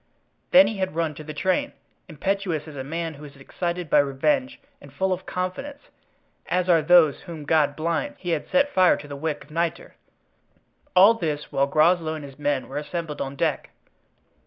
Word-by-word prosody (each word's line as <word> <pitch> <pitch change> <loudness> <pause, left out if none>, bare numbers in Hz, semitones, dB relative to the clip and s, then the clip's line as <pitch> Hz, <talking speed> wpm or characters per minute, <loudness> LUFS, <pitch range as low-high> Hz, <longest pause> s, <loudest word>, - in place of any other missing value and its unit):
Then 280 +2 +8
he 215 - -3
had 190 -4 -2
run 165 -2 -1
to 155 - -10
the 155 - -7
train, 185 - -1 0.4
impetuous 170 -1 -2
as 155 - -10
a 135 - -5
man 165 +3 -4
who 145 0 -13
is 145 -1 -11
excited 170 +5 -4
by 150 - +4
revenge, 260 - 0 0.2
and - - -14
full 190 0 0
of 180 - -7
confidence, 275 +11 -5 0.6
as 180 0 0
are 170 -3 +5
those 155 -2 +5
whom 165 -5 -9
God 150 -2 +2
blinds, 170 - -2
he 175 - -3
had 160 -3 -2
set 280 +1 +2
fire 185 -1 +5
to 145 - -10
the 145 - -7
wick 150 0 -3
of 150 - -20
nitre. 165 +1 -2 1.0
All 195 +5 +8
this 155 -9 -4
while 140 0 +1
Groslow 160 +2 +2
and 150 -2 -7
his 135 0 -13
men 145 -2 -1
were 135 - -6
assembled 150 +1 -4
on 135 0 -4
deck. - - -1
165 Hz, 190 wpm, -24 LUFS, 150-185 Hz, 1.0 s, Then